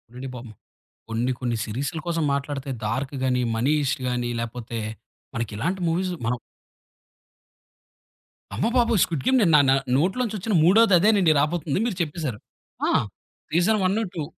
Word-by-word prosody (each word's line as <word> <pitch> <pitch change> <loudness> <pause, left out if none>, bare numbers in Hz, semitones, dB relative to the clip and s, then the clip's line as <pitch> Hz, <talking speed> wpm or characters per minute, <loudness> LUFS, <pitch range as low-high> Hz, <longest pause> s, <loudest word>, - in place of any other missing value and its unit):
అండి 130 +2 -6
పాపం, 120 -2 -9 0.6
కొన్ని 115 +3 0
కొన్ని 120 -2 -1
సీరీసుల 135 +9 -3
కోసం 165 -1 0
మాట్లాడితే 140 0 -3 0.2
'డార్క్' 130 +6 -2
గాని, 125 -1 +1
'మనీ‌హీ‌స్ట్' 140 +3 +1
గాని, 120 -1 -1
లేపోతే 115 0 -5 0.6
మనకిలాంటి 115 - -2
మూవీస్ 180 +3 0
మనం 120 +1 -1 2.2
అమ్మ - - 0
బాబోయ్! 235 -4 +3
'స్క్విడ్ 155 -6 0
గేమ్' 260 0 +4
నే - - +4
నా - - +8 0.4
నోట్లో 185 - +1
నుంచొచ్చిన 215 -2 -3
మూడోదదేనండి 195 -2 +5
రాబోతుంది, 150 +1 0
మీరు 225 -7 -2
చెప్పేసారు. 150 -8 -3 0.5
ఆ! - - +2 0.6
సీజన్ 180 +7 +3
1, 200 +5 +1
2 160 - -2
150 Hz, 130 wpm, -24 LUFS, 125-185 Hz, 2.2 s, నా